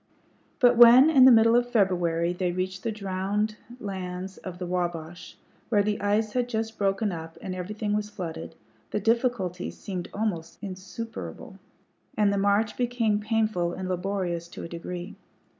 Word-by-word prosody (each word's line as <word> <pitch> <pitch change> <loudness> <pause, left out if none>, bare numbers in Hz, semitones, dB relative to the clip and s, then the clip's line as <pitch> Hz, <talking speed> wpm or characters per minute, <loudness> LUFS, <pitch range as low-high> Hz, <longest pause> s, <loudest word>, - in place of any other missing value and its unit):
But 245 -1 +5
when, 245 +6 +9
in 265 -4 +7
the 260 - +9
middle 230 0 +6
of 245 0 +2
February, 175 -6 +1
they 180 0 -1
reached 185 +1 -3
the 230 - -2
drowned 205 +1 -2 0.2
lands 190 -2 -5
of 180 -2 -8
the 180 - -5
Wabash, 175 -1 -4 0.3
where 205 -3 +3
the 210 0 -1
ice 210 +1 +1
had 245 -1 0
just 225 -1 -3
broken 200 +1 +1
up 165 -1 -7
and 190 - -5
everything 205 +3 -3
was 210 0 -1
flooded, 175 -6 -6 0.3
the - - -1
difficulties 225 -5 0
seemed 180 -3 -5
almost 200 -6 -3
insuperable, 195 +4 -7 0.6
and 205 -1 +3
the 200 - 0
march 205 +2 +1
became 235 -4 +1
painful 215 -5 0
and 185 0 -5
laborious 180 -2 -2
to - - -9
a - - -5
degree. 175 +2 -6
200 Hz, 160 wpm, -26 LUFS, 180-220 Hz, 0.6 s, when